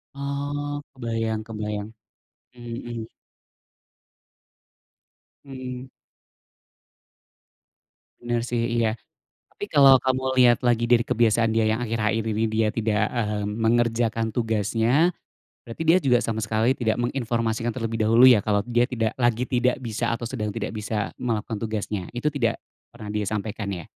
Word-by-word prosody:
Oh, 145 +1 -3 0.2
kebayang 115 -3 -2
kebayang. 105 -1 -5 0.7
Mmm, 120 -1 -7
mhm. 115 -2 -5 2.4
Mmm. 130 -1 -7 2.3
Bener 120 -1 -1
sih, 120 -1 -1
iya. 115 -2 +2 0.6
Tapi - - -7
kalau 140 -3 +7
kamu 130 0 0 0.2
lihat 120 -2 +6
lagi 120 -1 +2
dari 120 -1 +4
kebiasaan 115 -2 +2
dia 110 0 +2
yang 110 +2 0
akhir-akhir 110 -1 0
ini 110 +2 0
dia 110 0 +1
tidak, 110 -2 0
mmm, 105 -3 -2
mengerjakan 115 0 +1
tugasnya, 115 - +1 0.6
berarti 115 +7 -6
dia 165 +3 +6
juga 130 -8 +3
sama 110 -1 -2
sekali 110 +4 +1
tidak 110 -1 0
menginformasikan 120 -2 -1
terlebih 115 -2 -3
dahulu 115 +4 +7
ya, 125 -4 +7
kalau 105 -1 +2
dia 120 0 +2
tidak 115 -4 -2
lagi 120 -1 +2
tidak 125 -1 +1
bisa 115 0 -2
atau 120 0 -5
sedang 105 -4 -3
tidak 110 -3 -3
bisa 105 0 -2
melakukan 115 -2 -2
tugasnya. 105 -3 -3
Itu 120 +5 0
tidak 135 -6 -1 0.3
pernah 110 -3 -9
dia 105 0 -2
sampaikan 105 0 -3
ya? 85 -3 -8
115 Hz, 135 wpm, -24 LUFS, 110-125 Hz, 2.4 s, kalau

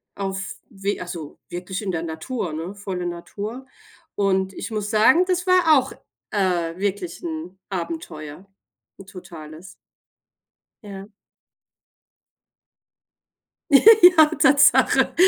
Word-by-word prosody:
Auf 195 0 -4 0.2
w 200 -3 -4
also 170 -4 -8
wirklich 180 +3 -6
in 195 - -2
der 165 -2 -3
Natur, 170 +3 -5
ne, 165 +5 -6
volle 190 -3 -5
Natur. 205 +8 -7 0.5
Und 190 -1 0
ich - - -7
muss 210 -1 -3
sagen, 255 +11 +4
das 360 -1 -1
war 355 -4 +5
auch, 260 +1 -6 0.4
äh, 180 -4 -1
wirklich 205 - -3
'n 315 - -7
Abenteuer, 165 -2 -7 0.6
'n - - -14
totales. 165 -3 -11 1.2
Ja. 195 -1 -9 2.6
Ja, 360 0 +7
Tatsache, 285 0 +4
195 Hz, 100 wpm, -22 LUFS, 175-255 Hz, 2.6 s, Ja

